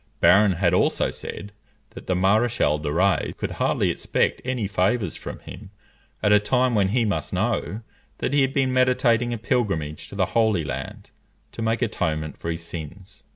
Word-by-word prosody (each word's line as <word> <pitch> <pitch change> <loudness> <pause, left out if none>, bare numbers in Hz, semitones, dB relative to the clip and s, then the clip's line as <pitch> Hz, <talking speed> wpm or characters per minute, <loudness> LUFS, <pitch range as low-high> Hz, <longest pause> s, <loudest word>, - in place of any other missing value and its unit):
Barron 95 +3 +5
had 90 0 +1
also 90 - +2
said, 100 - -7 0.4
that - - -11
the 95 - +1
Maréchal 95 -5 +2
de 75 -1 -2
Rays 95 +5 +1
could - - -3
hardly - - +1
expect - - -1
any 125 -5 -2
favours 100 0 0
from - - -7
him, 100 0 -11 0.5
at 105 - +3
a 105 - +7
time 125 +4 +1
when 100 -3 +3
he 115 +4 +1
must 100 - -2
know 110 +2 -1 0.4
that - - -2
he 145 - +4
had 135 0 +2
been 135 -2 +1
meditating 125 -2 +2
a 120 - -2
pilgrimage 100 -10 -2
to - - -10
the 95 -2 +2
Holy 110 -7 +2
Land 70 - -6 0.4
to - - -7
make 115 +2 0
atonement 80 -9 -2
for 85 - -6
his 85 0 -3
sins. 85 +4 -9
105 Hz, 180 wpm, -24 LUFS, 90-120 Hz, 0.5 s, a